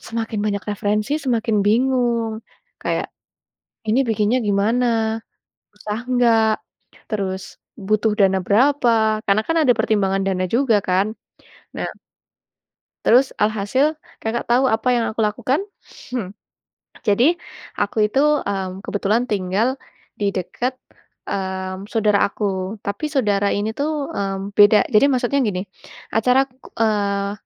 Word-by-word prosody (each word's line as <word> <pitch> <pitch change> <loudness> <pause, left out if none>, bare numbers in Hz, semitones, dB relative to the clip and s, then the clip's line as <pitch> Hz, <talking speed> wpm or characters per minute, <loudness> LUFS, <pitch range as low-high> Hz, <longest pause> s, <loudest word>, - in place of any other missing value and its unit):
semakin 225 -1 -4
banyak 200 -2 -1
referensi 210 +4 -1
semakin 230 -5 0
bingung. 235 -1 +1 0.4
Kayak - - -1 0.8
ini 235 +5 +3
bikinnya 220 +3 +1
gimana? 225 +2 +1 0.6
Susah 210 +1 -4
nggak? 230 -3 +4 0.6
Terus 195 -3 -2 0.3
butuh 215 +2 +1
dana 195 -1 +4
berapa? 225 -2 +3
Karena 200 +2 +3
kan 330 - +1
ada 255 - +5
pertimbangan 195 -3 +1
dana 185 -1 0
juga 235 -4 +3
kan? 190 +4 +1 0.6
Nah - - -3 1.2
Terus 255 +4 +5
alhasil 215 +8 +1 0.2
Kakak 230 +2 -3
tau 255 +3 +4
apa 225 0 +1
yang 240 -2 +2
aku 225 - -2
lakukan? 250 - 0 0.5
Hmm. 210 -6 -4 0.7
Jadi 245 +11 +4 0.5
aku 210 +1 +2
itu, 265 - -1 0.3
mmm, 190 -1 -3
kebetulan 210 +4 0
tinggal 200 +4 +1 0.5
di 200 -1 0
deket, 240 +8 -3 0.5
mmm, 190 0 -4
saudara 210 -3 +2
aku. 195 0 -3
Tapi 200 +9 -3
saudara 205 -8 +1
ini 210 +2 -1
tuh, 295 +2 -1 0.2
mmm, 195 0 -3
beda. 205 0 +6
Jadi 210 - +6
maksudnya 255 +1 +1
gini, 190 -4 -1 0.5
acara, 250 +4 +3 0.3
eee, 200 -2 +1
215 Hz, 120 wpm, -21 LUFS, 200-240 Hz, 1.2 s, beda